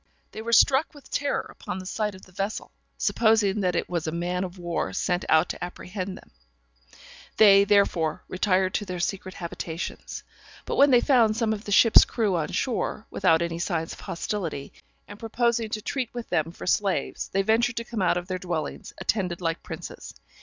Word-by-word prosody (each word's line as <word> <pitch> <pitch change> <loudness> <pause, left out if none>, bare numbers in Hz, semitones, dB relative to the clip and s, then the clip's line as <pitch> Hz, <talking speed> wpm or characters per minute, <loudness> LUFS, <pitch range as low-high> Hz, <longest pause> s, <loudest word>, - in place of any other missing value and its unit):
They 220 - -7
were 230 +1 -4
struck 270 +7 +4
with 290 - -16
terror 285 0 0
upon - - -7
the 185 - -7
sight 210 +1 -2
of 190 - -14
the 185 - -16
vessel, 195 +3 -4 0.3
supposing 220 -3 +2
that 180 -3 0
it - - -1
was 170 -3 -3
a - - -1
man 175 +2 -2
of 185 0 -6
war 175 -1 -3
sent 180 -1 -1
out 160 +2 +5
to - - -5
apprehend 185 +1 -6
them; - - -17 1.1
they, 200 -2 +7
therefore, 195 -6 +2
retired 185 0 +1
to 205 - -1
their 180 -2 -5
secret 185 +1 -3
habitations. 170 -1 -6 0.4
But - - -3
when 285 - +7
they 245 -2 +6
found 230 -6 +3
some 225 -2 +1
of 210 0 -7
the 205 - -5
ship's 225 +2 +7
crew 215 -6 0
on 160 -3 0
shore, 230 -3 -2
without 170 -3 +3
any 170 0 -3
signs 170 -2 -2
of - - -12
hostility, 170 -6 -4 0.3
and 205 0 -11
proposing 230 0 0
to 215 0 -4
treat 260 -2 -3
with 240 -1 -6
them 160 +1 0
for - - -9
slaves, 195 0 0
they 195 +1 +1
ventured 230 +3 +2
to 230 - -1
come 230 -3 -4
out 180 -1 +2
of 180 0 -4
their 185 -1 -3
dwellings 170 -5 -4
attended 180 -5 -1
like 165 -2 -2
princes. - - -8
195 Hz, 195 wpm, -26 LUFS, 175-220 Hz, 1.1 s, they